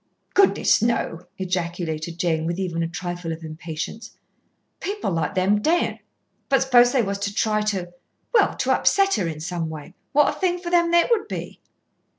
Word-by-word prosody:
"Goodness, 395 -1 +4
no!" 200 -7 -1
ejaculated 170 -3 -3
Jane, 160 -2 0
with 170 +1 -2
even 175 -3 -2
a 165 - 0
trifle 175 0 -5
of 165 0 -6
impatience. 160 +8 -7 0.6
"People 410 - -3
like 165 -3 -1
them 195 +3 +2
daren't. 340 +8 +1 0.5
But 270 -1 +4
suppose 245 -2 +5
they 255 -3 +2
was 200 -1 -3
to 200 0 -2
try 215 +1 +1
to, 195 -4 -2 0.4
well, - - +4
to - - 0
upset 395 0 +3
her 180 - 0
in 155 -2 -5
some 165 0 -3
way, 155 +2 -9 0.2
what 295 0 +3
a - - -14
thing 360 -2 +1
for 350 -1 -6
them 340 -1 +3
it 345 +7 +4
would 440 -3 +2
be." - - -6
190 Hz, 175 wpm, -23 LUFS, 165-265 Hz, 0.6 s, suppose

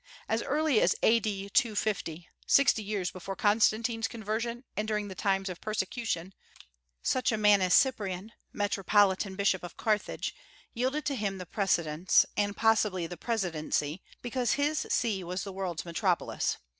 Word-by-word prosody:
As 225 +1 0
early 295 -4 +2
as 185 - +3
A.D. 205 -3 +2
250, 205 -9 0 0.2
sixty 275 -5 +5
years 200 -3 -2
before 195 +1 -6
Constantine's 225 +2 +2
conversion, 230 +2 -3
and 210 +1 -2
during 210 -1 -1
the - - -6
times 195 0 0
of 180 -2 -6
persecution, 210 -3 -3 0.7
such 255 -2 +1
a 220 - 0
man 210 -2 +5
as 185 -1 +4
Cyprian, 210 -6 +1 0.2
metropolitan 200 -1 +2
Bishop 195 -1 +1
of 175 - -9
Carthage, 215 -2 -1 0.4
yielded 260 +5 -1
to 290 - 0
him 200 -4 -2
the 180 - -7
precedence, 170 -3 +2
and 205 -1 0
possibly 210 -5 +2
the 175 +2 -6
presidency, 170 -6 -2 0.2
because 245 -1 0
his 300 +2 0
See 210 -6 0
was 180 +2 -4
the 195 -2 -7
world's 185 -4 -4
metropolis. 175 +1 0
205 Hz, 145 wpm, -29 LUFS, 185-225 Hz, 0.7 s, sixty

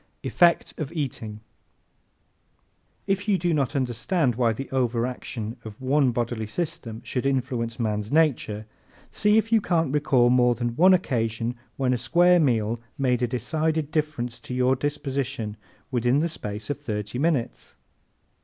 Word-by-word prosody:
Effect 175 -2 +3
of 150 -2 -3
Eating 130 -8 -4
¶ 105 - -11 1.7
If 200 +1 -1
you 200 -2 +3
do 175 -1 0
not 145 -1 0
understand 130 +3 0
why 120 0 +2
the 135 +5 -5
overaction 120 -2 -2
of 110 -2 -9
one 135 +1 +2
bodily 120 -2 -2
system 115 -5 -4
should 125 - -3
influence 125 -4 -1
a 120 - -2
man's 105 -1 -2
nature 135 -9 +1 0.5
see 210 +1 +3
if 220 +1 +1
you 225 -1 +5
can't 165 -7 +1
recall 135 -5 +3
more 125 -1 +4
than 120 0 -2
one 185 +6 +6
occasion 115 -7 -1 0.2
when 130 -2 +1
a 125 - -1
square 175 +7 +4
meal 115 -6 +1 0.2
made 125 -3 +1
a 125 - +2
decided 155 +5 -1
difference 150 -7 -2
in 125 - -3
your 130 +1 +3
disposition 135 -5 -3 0.4
within 125 +1 +2
the 165 +3 +1
space 105 -6 -5
of 145 - -4
thirty 105 +2 -4
minutes. 145 -6 -1
130 Hz, 155 wpm, -25 LUFS, 115-155 Hz, 1.7 s, one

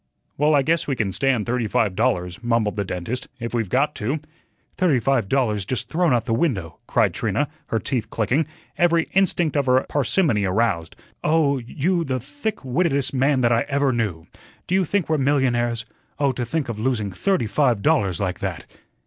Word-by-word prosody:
"Well, 150 +1 +3
I 140 - +4
guess 165 +3 +1
we 140 - 0
can 110 -5 -1
stand 125 +1 +1
thirty 120 -2 -1
five 110 -4 +1
dollars," 90 -4 -1
mumbled 115 -3 +1
the 100 - -1
dentist, 95 +6 -4
"if 115 0 -5
we've 115 -5 -1
got 145 +6 +2
to." 130 +9 -1 0.6
"Thirty 170 -9 +2
five 120 -4 +1
dollars 110 -7 +1
just 120 +5 -3
thrown 170 -1 +2
out 120 -2 +2
of - - -27
the 115 - -1
window," 115 - -1
cried - - +2
Trina, - - 0 0.2
her 115 - 0
teeth 110 -1 -2
clicking, 130 +9 0 0.3
every 170 -1 +3
instinct 180 -4 +2
of 140 -2 +1
her 130 +1 +3
parsimony 140 - +1
aroused. 95 -4 0 0.3
"Oh, 150 -3 +2
you 165 +9 -1
the 130 -4 -2
thick 145 - -5
wittedest 140 0 +1
man 135 0 +2
that 120 -1 +3
I 115 0 +3
ever 140 -1 +1
knew. 100 -9 -2 0.4
Do - - -3
you 190 -1 +3
think 195 +1 0
we're 155 -2 +1
millionaires? 120 -4 +1 0.3
Oh, 140 -2 +2
to 125 -1 -3
think 155 +2 -1
of 115 -3 -5
losing 110 -4 -1
thirty 180 - 0
five 115 -1 +1
dollars 100 - +2
like 95 -1 -2
that." 95 -4 -4
125 Hz, 190 wpm, -22 LUFS, 110-145 Hz, 0.6 s, I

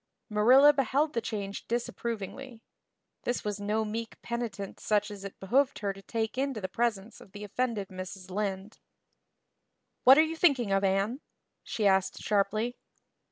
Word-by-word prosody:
Marilla 255 +8 +7
beheld 280 +3 +1
the 230 - 0
change 200 -3 -5
disapprovingly. 235 +1 -4 0.6
This 245 - -2
was 205 -1 -2
no 210 +2 0
meek 225 +1 -5
penitent 230 -5 -4
such 210 0 +1
as 200 -1 -8
it 200 - -8
behooved 260 +8 +2
her 200 -2 -2
to 195 - -13
take 225 +4 -3
into 270 -4 -1
the 190 - -3
presence 220 +1 -2
of 190 - -16
the 205 0 -8
offended 210 -1 -2
Mrs. 185 0 -8
Lynde. 195 +1 -3 1.2
"What 265 +2 +9
are 310 - +7
you 320 +1 -3
thinking 275 - +3
of, 195 0 +2
Anne?" 195 +7 +1 0.4
she 215 - -2
asked 190 -1 +3
sharply. 215 +4 0
215 Hz, 155 wpm, -29 LUFS, 195-245 Hz, 1.2 s, What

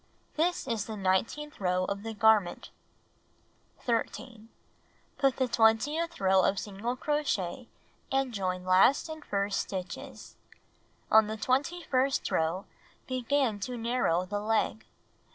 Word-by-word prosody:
This 335 -2 0
is 225 -5 -1
the 220 -1 -5
nineteenth 205 +11 -1
row 185 -1 +1
of 200 +1 -3
the 225 +1 -6
garment. 210 -4 +3 1.1
13. 230 -1 -3 0.7
Make 270 -2 +3
the 260 - 0
twentieth 275 +10 +2
row 190 0 +4
of 195 - +2
single 210 +5 -3
crochet 255 - -2 0.4
and 270 -2 0
join 185 -3 -2
last 190 - +4
and 315 -1 -7
first 200 0 -1
stitches. 185 -2 -6 0.7
On 220 -1 +6
the 220 +1 -4
twenty 285 +10 0
first 270 -1 0
row, 165 +4 0 0.4
begin 255 -3 0
to 245 +5 -4
narrow 230 -7 +1
the 205 +2 -3
leg. 220 +1 -1
225 Hz, 125 wpm, -29 LUFS, 195-265 Hz, 1.1 s, On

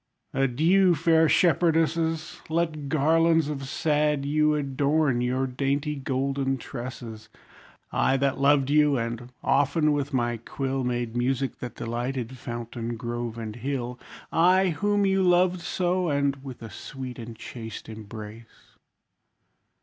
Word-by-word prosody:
Adieu! 165 +8 +3
Fair 160 +1 +4
shepherdesses! 165 -2 +2
Let 160 -3 -1
garlands 160 +1 +3
of 135 -2 -4
sad 150 -2 +1
yew 150 +1 +2
Adorn 140 -1 +1
your 130 +2 0
dainty 140 +3 -1
golden 135 0 -1
tresses. 120 -3 -8 0.6
I, 135 - +2
that 135 0 0
loved 140 0 +3
you, 150 -2 +4
and 120 +1 -4
often 145 +3 +3
with 145 -1 -1
my 120 -2 0
quill, 135 +3 -3
Made 120 -2 -2
music 130 +2 -1
that 125 -2 -6
delighted 120 +1 -3
fountain, 120 -1 -5
grove, 120 -1 -4
and 110 -1 -6
hill; 125 -1 -3 0.3
I, 185 +3 +4
whom 205 +5 +1
you 195 0 +2
loved 180 0 +3
so, 180 0 0
and 140 -1 0
with 130 -4 -9
a 110 - -8
sweet 130 +4 -7
and 115 -1 -8
chaste 110 -1 -8
embrace. 110 +1 -11
135 Hz, 125 wpm, -26 LUFS, 120-155 Hz, 0.6 s, Fair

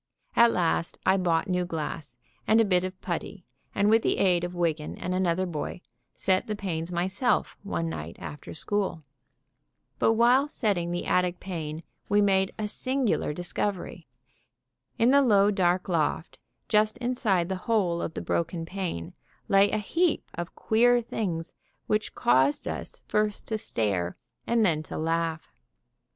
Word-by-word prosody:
At 235 0 +7
last 170 -2 0
I 190 - +5
bought 170 -4 +1
new 180 -1 +1
glass 155 -5 -5 0.3
and 220 +1 +5
a 225 - +5
bit 180 -3 +2
of 185 0 -5
putty 180 +1 -5 0.3
and 200 - +3
with 225 +1 +5
the - - +1
aid 180 -2 +3
of 175 0 -4
Wiggan 160 -3 -1
and 180 - -3
another 185 0 +1
boy, 175 +1 -4 0.3
set 185 -1 +1
the 215 - -2
panes 175 -4 -4
myself 190 +8 0
one 185 -4 -2
night 80 - -6
after 150 - -8
school. 190 -2 -2 1.0
But 225 - +4
while 245 +5 +4
setting 200 - -1
the 175 0 -3
attic 180 -1 +1
pane 160 -4 -5 0.3
we 205 0 +4
made 195 -2 +3
a 215 - -2
singular 255 - 0
discovery. 180 +3 -3 0.9
In 235 +3 +4
the 280 +1 +6
low, 205 -5 +4
dark 180 -2 +1
loft, 165 -1 -1 0.3
just 215 +1 +2
inside 240 -8 0
the 190 - -2
hole 180 -7 +2
of 160 - -4
the - - -3
broken 165 0 -1
pane, 175 - -4 0.3
lay 195 +1 +5
a 215 - 0
heap 335 - 0
of 175 0 -6
queer 245 +2 +3
things 185 -8 -3 0.3
which 215 0 -1
caused 130 +4 +2
us - - -6
first 210 -1 0
to 220 - 0
stare, 95 - -2 0.3
then 210 -10 +2
to - - -7
laugh. 165 0 -2
185 Hz, 155 wpm, -27 LUFS, 165-210 Hz, 1.0 s, At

